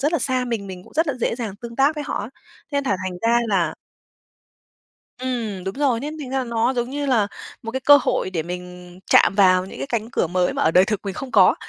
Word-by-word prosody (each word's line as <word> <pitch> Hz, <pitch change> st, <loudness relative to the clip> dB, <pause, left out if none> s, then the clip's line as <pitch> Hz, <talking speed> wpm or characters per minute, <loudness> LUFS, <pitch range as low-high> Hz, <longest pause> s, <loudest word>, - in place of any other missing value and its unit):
rất 295 Hz, +4 st, +1 dB
là 335 Hz, -, +2 dB
xa 255 Hz, 0 st, 0 dB
mình, 230 Hz, -5 st, -3 dB
mình 185 Hz, -1 st, -9 dB
cũng -, -, -18 dB
rất 320 Hz, +2 st, +1 dB
là 280 Hz, -, -1 dB
dễ -, -, +1 dB
dàng 220 Hz, -5 st, -5 dB
tương 235 Hz, +1 st, -9 dB
tác 280 Hz, +3 st, +3 dB
với 295 Hz, -1 st, -4 dB
họ -, -, -3 dB
á. 205 Hz, -, -6 dB, 0.4 s
Nên 280 Hz, 0 st, 0 dB
là 200 Hz, -7 st, +1 dB
thành 180 Hz, -1 st, -4 dB
ra 230 Hz, +1 st, +4 dB
là 190 Hz, -4 st, +1 dB, 1.4 s
Ừm, 235 Hz, -7 st, -3 dB
đúng 190 Hz, +1 st, -4 dB
rồi, 270 Hz, -5 st, +1 dB
nên 300 Hz, +4 st, -5 dB
thành 270 Hz, -4 st, -6 dB
ra 265 Hz, -1 st, -1 dB
nó 235 Hz, +2 st, 0 dB
giống 240 Hz, 0 st, -2 dB
như 285 Hz, +1 st, -3 dB
là 230 Hz, -7 st, +2 dB, 0.4 s
một 225 Hz, -, -5 dB
cái 265 Hz, -, -2 dB
cơ 290 Hz, +2 st, +7 dB
hội 185 Hz, -, 0 dB
để 165 Hz, -4 st, -2 dB
mình 180 Hz, 0 st, -8 dB
chạm -, -, +5 dB
vào 185 Hz, -2 st, +5 dB
những -, -, -10 dB
cái -, -, -4 dB
cánh 230 Hz, -2 st, -2 dB
cửa 175 Hz, -, 0 dB
mới 180 Hz, +1 st, +1 dB
mà -, -, 0 dB
ở 160 Hz, -, +3 dB
đời 185 Hz, +2 st, +6 dB
thực 210 Hz, -3 st, -1 dB
mình 195 Hz, -, -3 dB
không 260 Hz, +5 st, -7 dB
có, -, -, +6 dB
230 Hz, 255 wpm, -22 LUFS, 190-265 Hz, 1.4 s, cơ